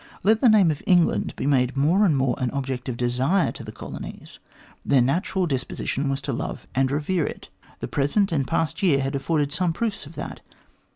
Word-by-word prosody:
Let 220 +2 +3
the 250 - +6
name 200 -6 +5
of 145 - -5
England 175 -2 +3
be - - -4
made 130 -2 +2
more 170 +9 +4
and 155 -7 +3
more 130 -2 +1
an 125 - 0
object 130 -1 -4
of 120 - -4
desire 125 +10 +1
to - - -9
the 110 - -8
colonies. 110 - -9 0.4
Their 140 - +3
natural 175 +8 +1
disposition 135 -1 -2
was 135 0 -2
to 140 -1 -3
love - - -5
and 130 0 +2
revere 150 +4 0
it. - - -8 0.3
The - - -3
present 160 +8 +1
and 140 -5 0
past 165 +7 -1
year 165 -8 +3
had 135 +1 -2
afforded 145 +1 0
some 170 +2 0
proofs 200 -4 -3
of 160 - -13
that. - - -6
145 Hz, 205 wpm, -24 LUFS, 135-175 Hz, 0.4 s, the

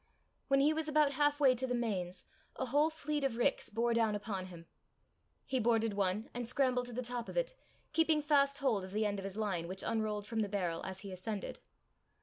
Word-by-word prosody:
When 275 0 +4
he 300 +3 +4
was 315 0 -2
about 300 -2 +4
half 290 +1 +2
way 270 -3 +6
to 255 +1 -2
the 250 - 0
Mains, 185 -6 -2 0.3
a 260 - -2
whole 290 +5 +3
fleet 300 -2 -3
of 260 -4 0
ricks 240 - +1
bore 230 +2 +1
down 225 -2 +2
upon 200 -3 -3
him. 170 -2 -11 0.8
He 260 -1 0
boarded 225 -2 +2
one, 200 +2 0
and 240 -1 -4
scrambled 250 -1 +1
to 245 - -7
the 250 +2 -3
top 240 -1 -4
of - - -6
it, - - +1 0.4
keeping 320 -2 +3
fast 280 -2 +3
hold 250 -9 +1
of 185 +1 -8
the 215 +1 +1
end 205 -1 -1
of 195 - -6
his 195 +1 -6
line, 190 -6 -1
which 190 +2 -4
unrolled 215 -2 -1
from 225 +1 -3
the 210 -2 0
barrel 180 -5 -1
as 190 0 -6
he 200 - -7
ascended. 195 +3 -5
230 Hz, 220 wpm, -34 LUFS, 200-275 Hz, 0.8 s, way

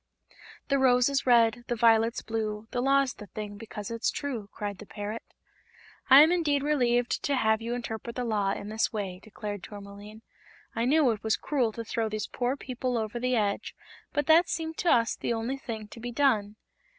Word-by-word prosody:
"The 275 0 +2
rose 250 -1 +4
is 275 -1 -1
red, 235 -1 +4
the 240 - -1
violet's 225 0 +3
blue, 215 -1 -3
The 245 - -1
law's 275 0 +3
the 210 - -11
thing, 205 0 -7
because 210 -1 -7
it's 230 0 0
true!" 240 -8 -4
cried 205 -2 -5
the 210 - -11
parrot. 210 +2 -5 0.9
"I 270 +2 +10
am 320 - +4
indeed 300 -6 +1
relieved 245 -5 +1
to 285 - 0
have 220 -3 +2
you 235 +1 -3
interpret 235 -1 -5
the 250 - -2
Law 205 -4 0
in 205 - -6
this 220 +1 0
way," 195 -4 -4
declared 210 -2 -6
Tourmaline. 205 +2 -11 0.5
"I 230 - 0
knew 280 -1 +4
it 215 -2 -4
was 220 0 +1
cruel 255 -7 0
to 230 - -5
throw 225 0 -2
these 215 0 -3
poor 250 +5 -2
people 255 -2 -3
over 220 +1 -3
the 250 +1 +1
edge, 205 -3 -1 0.4
but 290 -1 0
that 330 +3 +5
seemed 320 0 -3
to 355 - +1
us 230 -1 +3
the - - -2
only 230 +4 -2
thing 230 -7 -6
to 230 - -11
be 240 +1 -5
done." 225 -6 +1
230 Hz, 200 wpm, -28 LUFS, 215-260 Hz, 0.9 s, I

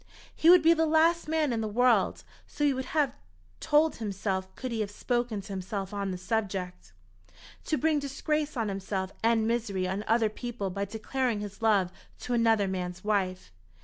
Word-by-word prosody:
He 325 - +4
would 355 -2 +8
be 330 +1 +7
the 325 -1 +1
last 325 +2 +3
man 310 -4 +1
in 225 - -1
the 220 - -2
world, 245 +3 +2 0.2
so 295 - -4
he 285 - +3
would 260 0 -3
have 285 -4 +3 0.5
told 305 +2 +3
himself 195 -3 -2
could 255 -1 -5
he 230 - -2
have 210 -2 -1
spoken 240 0 -2
to 195 +1 -8
himself 195 +1 -4
on 200 -1 -2
the 185 - -3
subject, 185 - -3 0.7
to 310 - 0
bring 310 0 +2
disgrace 290 +1 -2
on 225 -2 0
himself 195 -1 -3
and 225 -1 +3
misery 215 -6 -1
on 190 +3 -2
other 225 -1 +3
people 220 -3 -5
by 200 +2 -2
declaring 220 +2 -2
his 205 0 -8
love 200 -5 +3 0.3
to 250 - -3
another 225 -4 +3
man's 180 -1 -4
wife. 190 - -1
220 Hz, 180 wpm, -29 LUFS, 195-260 Hz, 0.7 s, would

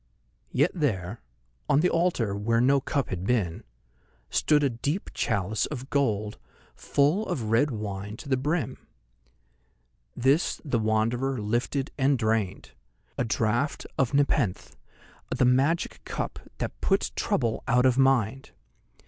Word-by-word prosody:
Yet 145 +7 +2
there, 110 - -2 0.5
on 140 - +4
the 180 - +3
altar 165 - +1
where 115 +3 +1
no 135 +3 +4
cup 140 -1 -1
had 90 -1 -4
been, 95 -7 0 0.7
stood 150 -1 +3
a 140 - +3
deep 145 - -3
chalice 100 +2 0
of 135 -2 -7
gold, 110 -7 0 0.3
full 155 +10 +1
of 120 -12 -2
red 120 +7 +4
wine 105 -2 -5
to 145 - -10
the 135 - +2
brim. 145 +1 -2 1.3
This 135 +7 +2
the 130 -5 0
Wanderer 115 +5 0
lifted 120 +6 -1
and 135 +1 +3
drained—a 110 +2 -3
draught 115 +5 0
of 135 0 +1
Nepenthe, 120 - +1 0.5
the 130 - +2
magic 135 +7 +1
cup - - -4 0.2
that - - -5
puts - - +1
trouble 115 -2 -1
out 125 +2 +3
of 130 0 +3
mind. 135 -2 +2
125 Hz, 130 wpm, -27 LUFS, 110-140 Hz, 1.3 s, on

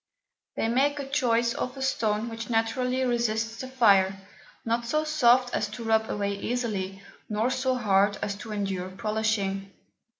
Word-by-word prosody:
They - - 0
make 275 +3 +1
choice 235 -4 +2
of 255 +2 -4
a 265 - -3
Stone 220 -4 0
which 225 +1 -6
naturally 250 +3 0
resists 230 -2 0
the 260 - -5
Fire, 200 -7 +4 0.5
not 230 +1 0
so 305 +5 +1
soft 255 -5 +3
as 210 - 0
to 210 +3 -8
rub 220 -1 +2
away 200 -1 -1
easily, 200 -6 -3 0.3
nor 220 +4 0
so 260 0 0
hard 205 -3 +2
as 200 - -2
to 220 +1 -8
endure 195 -3 -2
polishing. 200 -1 -1
225 Hz, 155 wpm, -27 LUFS, 205-250 Hz, 0.5 s, Fire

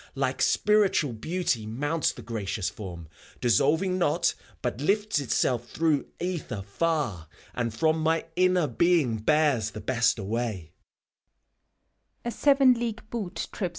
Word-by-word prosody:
Like - - -1
Spiritual 205 - +3
Beauty 130 -3 -2
mounts 145 +8 0
the 120 - -11
gracious 105 -3 -3
Form, 85 -6 -8 0.3
Dissolving 160 - +2
not, 150 -4 +2 0.3
but 130 - -2
lifts 205 +2 +1
itself 120 -2 0
through 155 -3 +1
ether 170 - -3
far, 110 - -1 0.3
And 120 -2 -2
from 155 +8 +1
my 160 +1 +1
inner 185 -1 +3
being 145 -3 +2
bears 140 -2 +2
the 110 - -8
best 120 0 +1
away. 105 -5 -3
135 Hz, 105 wpm, -27 LUFS, 110-165 Hz, 0.3 s, Spiritual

